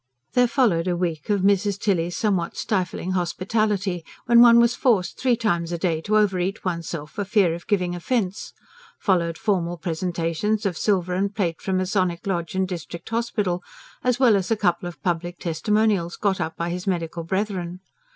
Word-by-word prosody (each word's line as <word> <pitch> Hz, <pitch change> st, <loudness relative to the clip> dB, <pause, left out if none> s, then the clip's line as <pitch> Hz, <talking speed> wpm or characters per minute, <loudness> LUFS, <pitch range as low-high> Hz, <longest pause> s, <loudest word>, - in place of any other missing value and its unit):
There 250 Hz, -1 st, +4 dB
followed 220 Hz, -10 st, +2 dB
a 175 Hz, -1 st, 0 dB
week 170 Hz, -3 st, -3 dB
of 205 Hz, -2 st, +2 dB
Mrs. 200 Hz, 0 st, +2 dB
Tilly's 175 Hz, -4 st, 0 dB
somewhat 190 Hz, -6 st, 0 dB
stifling 185 Hz, -2 st, -2 dB
hospitality, 190 Hz, 0 st, 0 dB, 0.2 s
when 235 Hz, 0 st, +6 dB
one 235 Hz, -1 st, +8 dB
was 235 Hz, 0 st, +4 dB
forced 230 Hz, -8 st, +1 dB
three 250 Hz, -2 st, +3 dB
times 175 Hz, -7 st, -1 dB
a 170 Hz, -, -1 dB
day 165 Hz, -2 st, 0 dB
to 215 Hz, +5 st, +1 dB
over 200 Hz, -3 st, +2 dB
eat 190 Hz, +4 st, -3 dB
oneself 170 Hz, -4 st, -4 dB
for 205 Hz, -, -3 dB
fear 195 Hz, -4 st, +2 dB
of 170 Hz, +1 st, -8 dB
giving 180 Hz, -4 st, +1 dB
offence; 190 Hz, +2 st, -2 dB, 0.5 s
followed 170 Hz, -4 st, +1 dB
formal 180 Hz, -6 st, 0 dB
presentations 170 Hz, +5 st, -1 dB
of 190 Hz, -4 st, 0 dB
silver 185 Hz, -1 st, 0 dB
and 195 Hz, +2 st, -1 dB
plate 170 Hz, -6 st, -1 dB
from 190 Hz, -1 st, -1 dB
Masonic 185 Hz, -2 st, 0 dB
Lodge 175 Hz, -3 st, -2 dB
and 190 Hz, 0 st, +1 dB
District 170 Hz, -2 st, -7 dB
Hospital, 215 Hz, -6 st, -1 dB, 0.4 s
as 250 Hz, -1 st, +1 dB
well 245 Hz, -5 st, +6 dB
as 190 Hz, -2 st, -1 dB
a 225 Hz, -, +2 dB
couple 175 Hz, -3 st, 0 dB
of 175 Hz, -, -14 dB
public 175 Hz, 0 st, -2 dB
testimonials 185 Hz, +1 st, 0 dB
got 195 Hz, -3 st, 0 dB
up 160 Hz, 0 st, -3 dB
by 170 Hz, +1 st, -2 dB
his 180 Hz, +2 st, -5 dB
medical 170 Hz, -2 st, -2 dB
brethren. 185 Hz, -1 st, -2 dB
185 Hz, 180 wpm, -23 LUFS, 170-210 Hz, 0.5 s, one